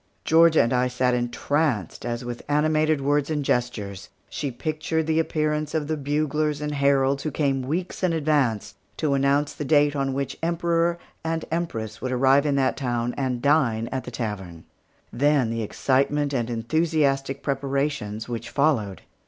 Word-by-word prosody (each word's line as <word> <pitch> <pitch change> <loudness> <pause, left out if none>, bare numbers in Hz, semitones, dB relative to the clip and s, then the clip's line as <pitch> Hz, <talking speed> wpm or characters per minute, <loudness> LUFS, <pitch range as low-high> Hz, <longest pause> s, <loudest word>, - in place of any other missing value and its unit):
Georgia 165 0 +5
and 115 - 0
I 125 0 +2
sat 125 0 +1
entranced, 120 - -1
as 120 +1 -3
with 120 -1 -5
animated 155 0 +2
words 145 +1 +1
and 150 -3 -1
gestures 105 -7 -2 0.2
she 145 - -3
pictured 155 +4 -2
the 160 0 +1
appearance 155 -1 -1
of 155 -2 0
the 155 - 0
buglers 150 +1 -1
and 150 0 -3
heralds 140 -1 +2
who 155 - -2
came 140 -3 0
weeks 165 +8 -3
in 185 -2 +2
advance 140 -9 0 0.2
to 150 -3 0
announce 140 +1 +2
the - - -5
date 145 0 +3
on 135 -1 -1
which 135 0 -3
the - - -1
Emperor 170 0 +1 0.3
and 165 0 -2
Empress 115 -11 -3
would 130 - -2
arrive 135 +3 +4
in 140 - +1
that 135 -1 +1
town 120 -2 -1
and 130 -3 -2
dine 130 -7 +2
at 130 -1 -2
the - - -7
tavern; 95 -9 -5 0.5
then 135 -2 +2
the 115 0 -2
excitement 140 +6 0
and 120 -3 -1
enthusiastic 135 +2 0
preparations 135 -6 -2
which 120 -2 -5
followed. 130 -10 0
140 Hz, 165 wpm, -24 LUFS, 125-155 Hz, 0.5 s, Georgia